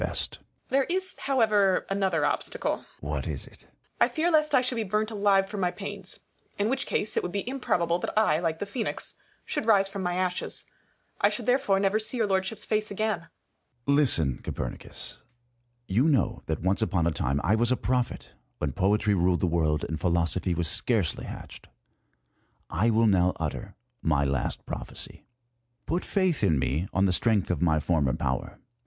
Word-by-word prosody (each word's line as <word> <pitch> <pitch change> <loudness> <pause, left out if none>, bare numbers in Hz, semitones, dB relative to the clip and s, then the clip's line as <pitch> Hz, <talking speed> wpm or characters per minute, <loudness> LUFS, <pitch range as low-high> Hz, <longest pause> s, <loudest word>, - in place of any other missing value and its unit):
There 270 0 +3
is 375 +1 -2
however 215 -8 +3
yet 195 - -1
another 185 -6 +1
obstacle. - - -1
Sion. - - -19 0.2
What - - -3
is - - -2
it? - - -14
Copernicus. - - -37
I - - +7
fear 335 +2 0
lest 305 -2 +3
I 255 - +6
should 250 -1 -2
be 225 - 0
burnt 215 +2 -1
alive 200 -2 +3
for 205 +1 -6
my 180 -2 +1
pains. 195 0 -8 0.4
In 205 +2 +1
which 265 +1 -1
case, 210 - -1
it - - +2
would 180 - -4
be 200 +3 -3
improbable 175 -10 0
that - - -4
I, 160 -8 +4
like 165 -2 -1
the 205 - -3
Phoenix, 220 +3 -4 0.3
should 220 - -3
rise 200 -3 +5
from 195 0 -5
my 180 -1 -1
ashes. 180 -1 -2 0.6
I - - +5
should - - -5
therefore 250 -6 +3
never 200 +2 +2
see 220 +3 -4
your 225 - +2
Lordship's 190 +1 -1
face 215 0 0
again. 210 -3 -2 0.6
Su7i. 140 - +4
Listen, 80 - +4
Copernicus. - - -5 0.7
You 115 +8 +2
know 140 -5 +1
that 80 0 -2
once 95 +4 +2
upon 90 -6 +1
a 85 - +2
time 70 -2 -1
I 95 - +3
was 120 +2 +2
a 130 - +3
prophet, 125 -1 -1 0.3
when 75 - -1
poetry 105 +7 +2
ruled 90 -1 +2
the - - +3
world, 80 -3 +1
and 80 -1 -4
philosophy 85 +1 +1
was 85 -1 0
scarcely 95 - +1
hatched. - - -9 1.0
I 105 +8 +2
will 115 0 +3
now 90 -3 +4
utter - - -4 0.3
my 75 -3 +2
last 70 -2 -1
prophecy. - - -7 0.6
Put 175 +4 -1
faith 185 - 0
in 80 -7 +4
me 75 +7 0
on 95 +1 +2
the 95 - +2
strength 105 -2 +2
of 85 - -2
my 80 -3 +3
former 75 -5 +1
power. - - -2
165 Hz, 185 wpm, -27 LUFS, -, 1.0 s, I